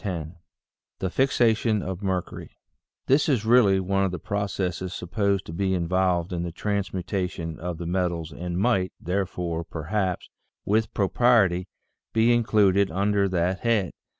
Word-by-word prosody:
VI 85 -6 -4 0.7
THE 95 - -3
FIXATION 115 -4 +2
OF 95 0 -5
MERCURY 95 -3 -4 0.5
HIS 140 +4 +3
is 120 -6 +1
really 110 -5 +5
one 95 +1 0
of 95 - +1
the 90 - -4
processes 95 -1 -3
supposed 100 +2 -1
to 80 - -8
be 95 +2 0
involved 90 0 0
in 85 - -2
the 85 0 -3
transmutation 90 -3 -3
of 85 0 -4
the 85 - -6
metals 85 -2 -1
and 85 +3 -5
might, 95 -1 +1
therefore, 90 -2 -2
perhaps, 90 +4 -3 0.4
with 110 +2 +1
propriety, 100 -3 +3 0.5
be 115 +2 +4
included 100 -4 +3
under 100 0 +1
that 90 +1 0
head. 110 -6 +1
95 Hz, 140 wpm, -25 LUFS, 90-105 Hz, 0.7 s, really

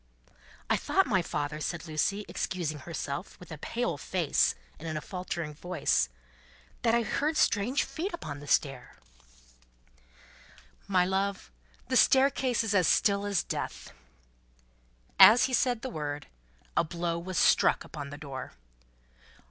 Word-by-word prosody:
"I - - +2
thought, - - +2
my 190 - +2
father," 150 -2 -3
said 165 +2 -4
Lucie, 195 +7 -1
excusing 165 -5 -3
herself, 150 +3 -6
with 180 -1 -13
a 155 - -7
pale 235 -5 -2
face 170 -1 +1 0.2
and 165 - -7
in 155 -1 -3
a - - -1
faltering 170 -3 -5
voice, 150 - 0 0.7
"that 230 0 +3
I 235 - +2
heard 305 +7 -1
strange 235 +4 +2
feet 360 +6 -4
upon 150 - -6
the 145 - -11
stairs." 135 -2 0 1.9
"My 185 -3 +3
love, 190 - -2 0.4
the - - -1
staircase 265 -3 +4
is 220 -2 -1
as 185 -4 +3
still 200 0 +3
as 195 -5 +1
Death." - - -5 1.3
As 235 +3 +9
he 260 - 0
said 245 -1 +1
the 260 - -3
word, 145 -3 -4 0.5
a - - +4
blow 170 +1 -3
was 180 +1 -5
struck - - +4
upon 145 -2 -8
the 145 - -8
door. 140 -3 -7
180 Hz, 140 wpm, -29 LUFS, 150-210 Hz, 1.9 s, As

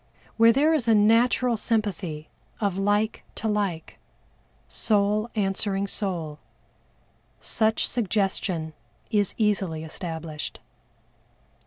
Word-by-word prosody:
Where 230 0 +6
there 295 +6 +3
is 275 -7 0
a 225 - +5
natural 235 +3 +3
sympathy 190 -9 -2 0.3
of 200 -4 0
like 205 +3 0
to 220 - -3
like, 200 -6 -2 0.7
soul 210 +1 +1
answering 195 -1 0
soul, 170 -7 -3 1.0
such 220 0 0
suggestion 190 -7 -1 0.4
is 205 -3 +4
easily 195 -7 0
established. 160 -2 -5
205 Hz, 95 wpm, -25 LUFS, 175-220 Hz, 1.0 s, Where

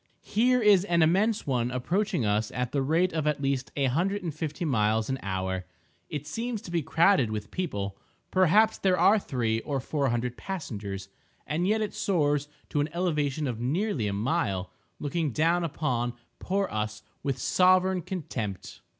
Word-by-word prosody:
Here 250 +4 +3
is 205 -5 +5
an 170 -3 +3
immense 200 +7 +2
one 125 -3 0
approaching 170 - 0
us 105 +1 +1
at 125 -1 -2
the 140 - +1
rate 165 +7 +2
of 155 -2 -1
at 150 -1 +1
least 135 -3 -1
a 140 - 0
hundred 185 +10 0
and 165 -3 -3
fifty 155 +2 -4
miles 110 -4 +1
an 130 - -2
hour. 95 -1 -3 0.4
It 145 -1 -4
seems 230 +5 -3
to 175 - -8
be 170 -1 +1
crowded 165 - +3
with 105 -1 -5
people—perhaps 185 - +1
there 185 -2 +2
are 215 +2 +5
three 115 - -1
or 140 +3 -2
four 140 +1 -1
hundred 120 +1 -2
passengers—and 110 - -5
yet 220 +2 +2
it 215 - -2
soars 145 -6 +1 0.2
to 145 - 0
an 145 - -1
elevation 150 -5 0
of 120 -4 -3
nearly 145 - 0
a 100 - -1
mile, 100 - -1 0.3
looking 155 +1 -1
down 170 +5 +2
upon 125 -7 -1 0.3
poor 195 +1 0
us 105 0 -3 0.2
with 135 -2 -1
sovereign 185 +5 +3
contempt. 120 - -5
150 Hz, 165 wpm, -28 LUFS, 120-180 Hz, 0.4 s, is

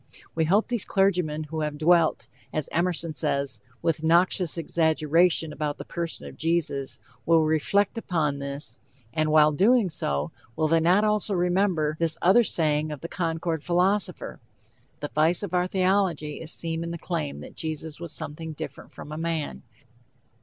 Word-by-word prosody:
We 160 -1 +1
hope 200 +7 +3
these 240 -4 -1
clergymen 180 -6 +1
who 155 +1 -4
have 150 -1 -2
dwelt, 165 0 +3 0.3
as 155 -2 -2
Emerson 170 -1 0
says, 140 -4 -1 0.2
"with 160 -1 0
noxious 170 +1 +3
exaggeration 160 0 +2
about 150 -1 -3
the - - -8
person 170 -1 -4
of - - -10
Jesus," 160 -5 -1 0.3
will 165 -1 +4
reflect 190 +8 +1
upon 150 -9 -1
this, 140 +1 -5 0.3
and 155 -1 +1
while 155 0 +6
doing 205 - +3
so, 75 - -2 0.2
will 155 -1 +1
they 165 +1 +3
not 180 +6 +4
also 210 -1 +1
remember 175 -4 +1
this 165 -1 0
other 210 +7 +5
saying 155 -5 0
of 150 - -6
the 170 - -5
Concord 165 -2 -2
philosopher: 185 +4 0 0.6
"The 145 - -4
vice 160 +5 +2
of 190 -3 -5
our 180 0 +2
theology 185 -5 0
is 160 0 -5
seen 165 0 -2
in 170 - -4
the 170 - -4
claim...that 160 -4 -4
Jesus 160 -1 -4
was 170 -2 -6
something 160 +2 -5
different - - -8
from 150 - -9
a 155 - -5
man." 165 -2 -3
165 Hz, 160 wpm, -26 LUFS, 155-180 Hz, 0.6 s, while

